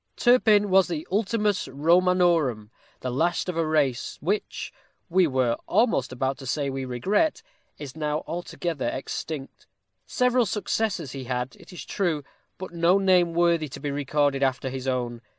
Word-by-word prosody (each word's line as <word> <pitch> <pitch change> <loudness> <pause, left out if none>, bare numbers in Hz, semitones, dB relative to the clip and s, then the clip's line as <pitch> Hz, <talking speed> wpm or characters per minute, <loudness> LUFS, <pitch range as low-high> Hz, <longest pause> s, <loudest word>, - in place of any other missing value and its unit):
Turpin 215 -5 +4
was 190 0 +5
the 165 -3 -4
ultimus 210 0 0
Romanorum, 165 - +2 0.3
the 130 - -3
last 170 +9 0
of 180 - -3
a 165 -1 0
race, 145 -6 0
which 200 +7 -3 0.4
we 180 0 +4
were 130 -4 +1
almost 215 - +2
about 130 +1 -2
to 135 - -8
say 140 +1 -1
we 135 0 -4
regret 195 - 0 0.3
is 140 -3 -8
now 150 -1 -2
altogether 170 -3 -4
extinct. 140 +1 -6 0.4
Several 250 -2 +2
successors 200 - -2
he 135 -1 -7
had, 125 0 -3
it - - -15
is 180 - -8
true, 170 -7 -1 0.3
but 185 - -7
no 170 +2 +3
name 180 -3 +3
worthy 170 -2 +2
to 140 - -9
be 145 0 -3
recorded 145 0 0
after 130 -1 0
his 130 0 -5
own. 120 -2 -2
160 Hz, 155 wpm, -25 LUFS, 135-185 Hz, 0.4 s, was